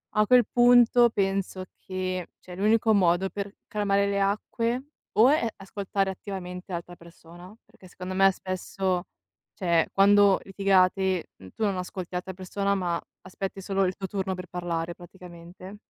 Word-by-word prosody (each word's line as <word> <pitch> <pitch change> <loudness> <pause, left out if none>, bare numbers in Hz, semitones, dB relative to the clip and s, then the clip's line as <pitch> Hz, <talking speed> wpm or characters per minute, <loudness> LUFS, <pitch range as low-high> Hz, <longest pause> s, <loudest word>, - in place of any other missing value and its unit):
A 215 - +4
quel 250 0 +6
punto 245 0 +6
penso 195 -2 -1 0.2
che, 185 -1 -3
cioè, 180 - -11
l'unico 220 +3 +2
modo 185 0 +2
per 200 0 -6
calmare 200 -1 +1
le 200 0 0
acque 230 +5 -1 0.3
o 230 +4 +6
è 290 -5 +2
ascoltare 195 0 -2
attivamente 185 -1 -7
l'altra 175 0 -6
persona, 170 +3 -15
perché 185 - -18
secondo 185 +1 -7
me, 195 0 +5
spesso, 185 0 -3 0.5
cioè, 170 -3 +1
quando 200 0 +5
litigate, 190 -2 +1 0.3
tu - - -3
non 195 -2 0
ascolti 180 0 -5
l'altra 180 +1 -4
persona, 195 +2 -2
ma 175 -3 -1 0.2
aspetti 195 +1 -6
solo 195 0 0
il 185 - -1
tuo 195 - -5
turno 190 -1 -3
per 180 0 -8
parlare, 170 -1 -4
praticamente. 180 +1 -12
190 Hz, 145 wpm, -26 LUFS, 180-200 Hz, 0.5 s, quel